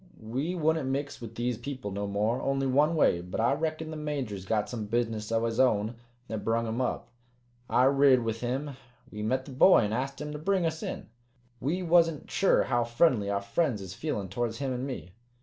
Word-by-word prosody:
We 130 +11 -3
wouldn't 160 -4 +1
mix 140 0 -3
with 115 -1 -8
these 120 -1 -2
people 130 -4 -5
no 100 +1 -3
more 105 +4 0
only 135 0 0
one 145 +5 +3
way 85 - +3
but 90 +1 -5
I 115 +4 +3
reckon 155 +1 -2
the - - -5
Major's 135 -11 -4
got 105 -1 +1
some 110 -4 -5
business 115 -1 -1
o' 115 0 +1
his 115 -1 -2
own 110 -4 +3 0.3
that 110 -2 -4
brung 115 +1 +1
him 115 +3 -2
up. 125 - -2 0.6
I 125 - +4
rid 135 -2 +5
with 115 0 -3
him. 130 +3 -3 0.3
We 105 - -6
met 130 +5 0
the - - -9
boy 135 +7 +6
an' 105 -1 -1
ast 135 +3 -2
him 150 0 -5
to 150 - -5
bring 185 +2 +1
us 160 -1 -2
in. - - -5 0.5
We 170 +8 -1
wasn't 165 -3 +3
sure 195 - +3
how 120 -2 +1
friendly 120 -3 +2
our 100 0 -1
friends 135 0 0
is 95 -2 -7
feelin' 100 - -3
towards 115 +2 -2
him 135 -2 -2
an' 125 +2 -3
me." 125 -9 -6
125 Hz, 210 wpm, -29 LUFS, 110-145 Hz, 0.6 s, boy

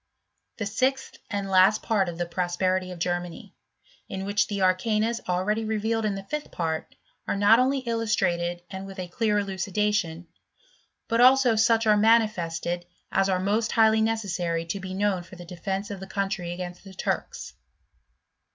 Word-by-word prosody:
The 220 - -3
sixth 260 +6 -1
and 200 -1 -2
last 190 +3 +4
part 200 -5 +1
of 170 - -7
the 175 - -1
Prosperity 185 +1 -1
of 180 - -7
Ger 175 +1 0
laany; 175 +3 -11 0.6
in 190 0 -4
which 205 +1 +1
the 200 -1 -3
arcanas 215 +5 +1
already 200 +5 0
revealed 220 +1 -1
in 205 -2 0
the 195 - -6
fifth 300 +8 -5
part, 160 -2 -3 0.3
are - - 0
not 205 +4 +5
only 265 +2 +2
illustrated 195 -8 -1
and 190 0 -6
with 195 0 -10
a 185 -1 -4
clear 210 +3 0
elu 200 -2 -2
cidation, 195 -3 -1 0.8
but 230 0 +2
also 255 -2 +6
such 225 +1 +3
are 210 -1 +5
manifested 175 -6 +1 0.2
as 195 0 +2
are 185 -1 +1
most 210 +4 0
highly 220 -1 +4
necessary 180 -7 -1
to 180 +4 -4
be 190 0 -6
known 200 -2 +1
for 175 +1 -13
the 175 0 -10
defence 190 +3 -4
of 200 - -6
the 190 - -8
country 195 -3 -2
against 175 0 -6
the 195 -1 -12
Turks. - - -3
195 Hz, 170 wpm, -26 LUFS, 180-220 Hz, 0.8 s, also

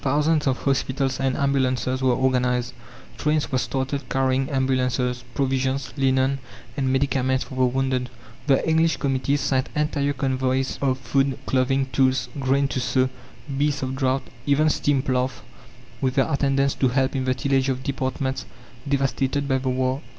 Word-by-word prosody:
Thousands 150 +2 +2
of 130 -1 +2
hospitals 135 -1 0
and 135 -1 0
ambulances 130 -2 0
were 130 -2 +3
organized; 125 -1 +1 0.5
trains 150 -1 0
were 130 - +2
started 130 +2 -3
carrying 135 0 +1
ambulances, 125 -2 0
provisions, 135 0 0
linen, 135 -1 +2 0.4
and 135 -2 0
medicaments 130 -1 +1
for - - -11
the 130 0 +2
wounded. 130 0 0 0.4
The 135 +1 +3
English 160 +1 +3
committees 140 +1 0
sent 130 -1 0
entire 145 -1 0
convoys 130 -1 -1
of 130 -2 +1
food, 135 0 0
clothing, 135 +1 +1
tools, 130 -1 +2
grain 135 +1 +2
to 130 - -2
sow, 130 +1 +1 0.5
beasts 145 -1 +1
of 130 0 -2
draught, 135 0 0 0.2
even 150 +2 +4
steam 140 -3 +1
ploughs 130 -2 -1 0.6
with 130 -1 0
their 135 - +2
attendants 140 -1 +2
to 130 - +1
help 130 +2 +1
in 130 -1 -1
the 130 0 +1
tillage 135 0 +1
of 130 0 -2
departments 130 0 -2 0.4
devastated 140 0 0
by 135 -1 +1
the 130 0 -2
war! 130 +1 0
135 Hz, 155 wpm, -23 LUFS, 130-140 Hz, 0.6 s, even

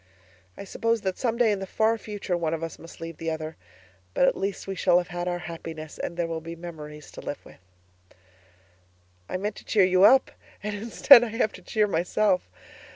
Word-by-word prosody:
I - - -7
suppose 230 +3 -1
that 190 -2 -3
some 235 -3 0
day 235 -3 +4
in 205 - -1
the 195 - -5
far 220 +4 +2
future 205 -4 -4
one 165 -2 -1
of 165 - -6
us 165 - -6
must 165 - -12
leave 165 -1 -7
the 165 - -3
other; 160 0 -4 0.6
but 180 - +4
at - - +2
least 195 0 -3
we 195 - -4
shall 180 -2 +3
have 180 0 -1
had 175 0 -4
our 175 0 -1
happiness 160 -2 -8
and 170 - -4
there 175 - 0
will 165 -1 -4
be 165 +1 -7
memories 150 -3 -9
to - - -9
live 145 - -6
with. - - -15 1.7
I - - -2
meant 205 +2 -3
to - - -11
cheer 200 -4 +3
you 185 0 +3
up 260 +6 +6 0.3
and 210 0 -3
instead 235 +4 +7
I - - -1
have 225 0 0
to - - -11
cheer 215 -2 +1
myself. 185 - +1
180 Hz, 215 wpm, -26 LUFS, 165-210 Hz, 1.7 s, instead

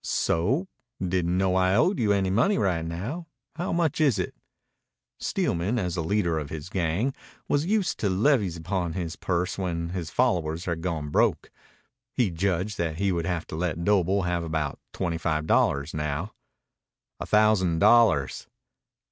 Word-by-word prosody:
"So? 125 - 0 0.3
Didn't 90 -1 0
know 95 -1 +2
I 95 0 +3
owed 180 - +3
you 110 -3 +2
any 95 -2 +1
money 125 - +3
right 90 -5 +1
now. 105 - -5 0.3
How 175 +2 -2
much 165 -3 +1
is 140 -9 +4
it?" 90 - -2 0.9
Steelman, 90 +8 -1
as 90 -6 -1
the 85 - -2
leader 85 -2 +1
of 75 -2 -6
his 80 +2 -6
gang, 95 +9 0 0.3
was 145 +3 +1
used 200 -3 0
to 100 - +1
levies 100 - +2
upon 85 0 -2
his 85 -2 -4
purse 90 +2 -2
when 85 -3 -2
his 90 -3 -4
followers 85 -9 0
had 85 -2 -2
gone 80 -4 -3
broke. - - +1 0.6
He 115 -7 +2
judged 95 +3 -1
that 80 -2 -1
he 100 +1 +1
would 85 -2 -1
have 85 -2 -2
to - - -5
let 85 0 -2
Doble 100 -1 +2
have 90 -1 -1
about 80 -3 -2
twenty 85 -2 -2
five 80 -1 -1
dollars 70 0 +2
now. 75 +6 -3 0.9
"A - - -5
thousand 105 -5 +3
dollars." 95 - +4
90 Hz, 165 wpm, -26 LUFS, 85-105 Hz, 0.9 s, is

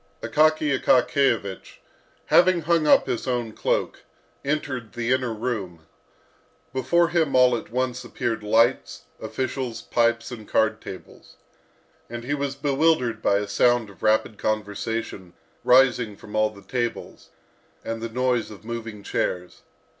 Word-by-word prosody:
Akaky 155 -1 +3
Akakiyevich, 120 -7 +1 0.5
having 180 -1 +4
hung 165 -1 +1
up - - +6
his 120 - -3
own 120 -3 -1
cloak, - - -1 0.4
entered 135 -6 -3
the 120 0 -2
inner 130 -2 0
room. 105 -8 -4 0.9
Before 170 +7 +2
him 160 -6 +1
all 125 -1 +5
at 115 - -6
once 125 +1 -2
appeared 120 -1 -3
lights, 115 +4 +1 0.2
officials, 130 -3 -4
pipes, 115 +1 +1
and 110 -3 -9
card 110 0 +1
tables, 95 - -11 0.7
and 120 0 -6
he 135 +4 -2
was 140 -1 -2
bewildered 140 -5 +1
by 100 - +3
a 105 0 -2
sound 120 -1 +2
of 100 - -20
rapid 110 0 +1
conversation 105 -3 -3 0.3
rising 125 -5 +4
from 105 - -11
all 110 0 +3
the 100 -2 -15
tables, 120 -2 -4 0.6
and 115 0 -4
the 115 - -4
noise 125 0 0
of 105 0 -13
moving 115 -3 -6
chairs. 90 -2 -3
120 Hz, 135 wpm, -24 LUFS, 110-130 Hz, 0.9 s, up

